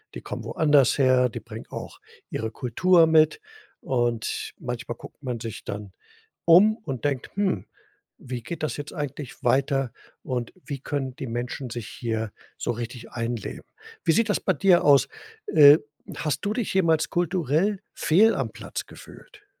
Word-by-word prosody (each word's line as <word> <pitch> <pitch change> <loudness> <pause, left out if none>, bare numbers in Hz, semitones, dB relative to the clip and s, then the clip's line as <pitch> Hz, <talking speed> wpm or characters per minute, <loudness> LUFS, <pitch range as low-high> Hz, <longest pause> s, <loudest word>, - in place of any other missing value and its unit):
die - - -6
kommen - - -6
woanders 145 -5 +3
her, 130 -2 +4
die - - -6
bringen - - -10
auch - - -8 0.3
ihre 110 0 -3
Kultur 165 +9 +3
mit. 160 - +4 0.4
Und, 120 -3 -1
manchmal 120 -1 -5
guckt - - -13
man 125 -4 -3
sich 115 -1 -6
dann 100 -1 -6 0.5
um 190 +6 +7
und 145 - -6
denkt: 135 -4 -1
„Hm, 190 - 0 0.5
wie 125 -1 -6
geht 155 +7 -6
das 155 - -2
jetzt 145 0 -7
eigentlich 145 -3 -6
weiter 135 0 +2 0.3
und 125 -3 -3
wie 140 -3 -5
können 135 -2 -3
die 130 - -6
Menschen 120 +2 -4
sich 115 -3 -6
hier 110 -2 -3 0.3
so - - -1
richtig 120 +1 -6
einleben?“ 115 -2 -4 0.4
Wie 165 - +3
sieht 225 +2 +2
das 205 - +2
bei 190 - +1
dir 180 +1 +4
aus? 140 -2 +6 0.4
Äh, 145 -1 +8 0.4
hast 150 -2 -1
du 205 - 0
dich 240 -2 -2
jemals 165 -3 +2
kulturell 175 +3 +1
fehl 210 +8 +4
am - - -1
Platz - - -6
gefühlt? 420 -5 -15
140 Hz, 160 wpm, -25 LUFS, 120-165 Hz, 0.5 s, Äh